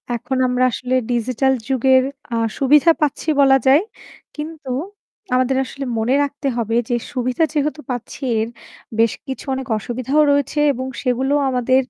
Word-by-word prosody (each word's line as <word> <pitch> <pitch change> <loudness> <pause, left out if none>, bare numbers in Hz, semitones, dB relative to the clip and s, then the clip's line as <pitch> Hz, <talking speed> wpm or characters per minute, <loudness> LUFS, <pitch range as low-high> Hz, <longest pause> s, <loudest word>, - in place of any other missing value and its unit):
এখন 245 +3 -3
আমরা 250 0 +1
আসলে 255 +2 -2 0.2
ডিজিটাল 255 +3 +1
যুগের 260 0 +4 0.3
আ - - +1 0.2
সুবিধা 295 +4 +5
পাচ্ছি 300 +1 -1
বলা 270 -1 +6
যায় 280 +5 +6 0.5
কিন্তু 300 -2 -6 0.6
আমাদের 255 +1 +2
আসলে 275 +1 -7
মনে 225 +3 +1
রাখতে 285 0 -4
হবে 230 -1 -1
যে 240 - +1 0.2
সুবিধা 255 +3 0
যেহেতু 300 +1 -1
পাচ্ছি 245 -1 -6 0.2
এর 220 - -1 0.5
বেশ 225 -1 +4
কিছু 265 +1 -6
অনেক 265 0 -4
অসুবিধাও 255 +7 0
রয়েছে 285 +1 0
এবং 260 +1 -4 0.2
সেগুলো 260 +2 0 0.2
আমাদের 255 +1 +2
260 Hz, 145 wpm, -20 LUFS, 245-280 Hz, 0.6 s, বলা